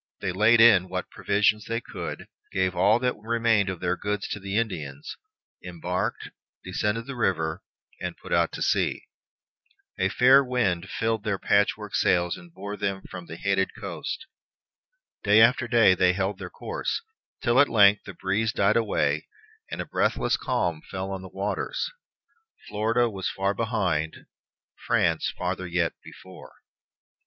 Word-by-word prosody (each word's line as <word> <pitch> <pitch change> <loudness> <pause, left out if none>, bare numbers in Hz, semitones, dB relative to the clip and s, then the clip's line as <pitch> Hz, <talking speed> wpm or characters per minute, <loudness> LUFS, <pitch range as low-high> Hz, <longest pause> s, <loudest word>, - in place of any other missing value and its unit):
They 95 - -2
laid 110 +5 +4
in 100 -6 +6
what 90 0 -4
provision 105 +1 +2
they 115 0 -1
could, - - -7 0.2
gave 95 -1 0
all 100 +5 +4
that 125 +1 0
remained 115 -2 +1
of 95 -3 -5
their 90 0 0
goods 105 +1 -3
to 105 - -4
the 100 +1 -3
Indians, 75 -11 -3 0.5
embarked, 90 0 -3 0.3
descended 105 +5 -2
the 140 0 -6
river, 80 -6 -1 0.4
and - - -5
put - - -12 0.2
to - - -7
sea. - - +1 1.0
A 95 - +2
fair 130 +5 +6
wind 100 -9 -1
filled 110 +4 -1
their 105 -3 -1
patchwork 100 +1 +1
sails 90 -1 +2
and 175 - -14
bore 105 -8 -7
them 95 -1 -2
from 90 -2 -8
the 85 - -7
hated 95 +2 0
coast. 100 - -5 1.0
Day 105 +1 +5
after 120 +2 +5
day 115 -5 +5
they 90 0 +3
held 95 +2 -2
their - - -6
course, - - -4 0.4
till 120 0 +3
at 145 - +5
length 105 -1 +5
the 100 - -9
breeze 105 +5 0
died 100 0 +2
away 115 -2 0 0.4
and - - -6
a - - -5
breathless - - +1
calm 90 -12 -1
fell 95 +1 -4
on 95 -1 -4
the 95 - -10
waters. 105 - -3 0.8
Florida 115 +3 +1
was 95 -4 -3
far 95 +1 -1
behind; 95 -9 -1 0.6
France - - +2
farther 90 0 -3
yet 85 -1 0
before. 95 0 -13
100 Hz, 150 wpm, -26 LUFS, 95-115 Hz, 1.0 s, in